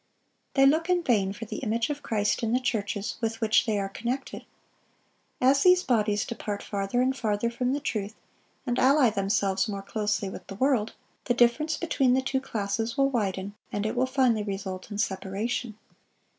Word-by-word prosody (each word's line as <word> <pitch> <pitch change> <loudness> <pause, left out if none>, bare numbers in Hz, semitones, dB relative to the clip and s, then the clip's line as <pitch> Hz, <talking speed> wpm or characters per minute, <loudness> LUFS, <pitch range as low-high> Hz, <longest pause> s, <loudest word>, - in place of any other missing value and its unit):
They 270 -1 +6
look 320 +5 +3
in 355 -1 +2
vain 205 -9 +2
for 215 +3 -7
the - - -6
image 230 +2 -1
of 290 0 -5
Christ 210 -4 0
in 230 0 0
the 250 - +3
churches 205 -4 -2
with 225 0 -2
which 220 +1 +3
they 215 -2 +1
are 195 -1 -1
connected. 240 +7 -4 0.9
As 270 +2 +4
these 365 0 +5
bodies 210 -4 +1
depart 210 -3 -5
farther 200 +4 -1
and 265 +1 +1
farther 220 -1 -1
from 250 +1 -1
the 285 - -1
truth, 215 -6 -3 0.5
and 245 -2 0
ally 265 -2 +5
themselves 195 -1 0
more 200 -1 -4
closely 210 -1 -1
with 190 - -8
the 195 - -7
world, 250 -2 +1 0.3
the 245 - +1
difference 245 +7 +3
between 270 -7 +2
the 260 - +1
two 265 0 -1
classes 225 +1 -3
will 275 0 +3
widen, 200 -4 -2 0.2
and 205 0 -2
it 215 - -1
will 255 +1 +2
finally 255 -4 +2
result 195 -2 -5
in 205 - -5
separation. 210 +3 -2
225 Hz, 185 wpm, -27 LUFS, 205-260 Hz, 0.9 s, They